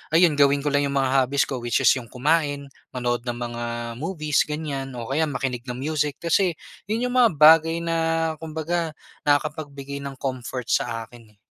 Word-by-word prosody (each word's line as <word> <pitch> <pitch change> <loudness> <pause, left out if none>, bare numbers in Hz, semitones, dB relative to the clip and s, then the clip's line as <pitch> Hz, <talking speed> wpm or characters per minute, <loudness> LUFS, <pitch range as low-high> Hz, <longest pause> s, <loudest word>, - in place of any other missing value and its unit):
ayun 165 -4 +4
gawin 140 0 +4
ko 145 - 0
lang 145 0 +2
'yung 140 - -3
mga 135 -1 +2 0.2
hobbies 140 +1 +2
ko 130 - -4
which 120 -2 0
is - - +7
'yung 120 - -11
kumain, 145 +1 0 0.2
manood 120 -1 -2
ng 120 - -1
mga 120 0 -5 0.4
movies 155 -2 0
ganiyan, 140 -4 -4
o 120 +1 -6
kaya 155 +3 +1
makinig 130 -3 -3
ng 125 - -4
music, 150 +2 -1
kasi 170 +1 +1 0.3
'yun 225 +3 -1
'yung 250 0 -1
mga 230 -8 +5
bagay 165 +2 +6
na 165 0 -1 0.4
kumbaga 160 0 -3 0.3
nakakapagbigay 145 -1 -1
ng 140 -1 -6
comfort 130 -2 -4
sa 115 -1 0
akin, 115 -2 -17
eh. - - -39
140 Hz, 180 wpm, -24 LUFS, 130-160 Hz, 0.4 s, is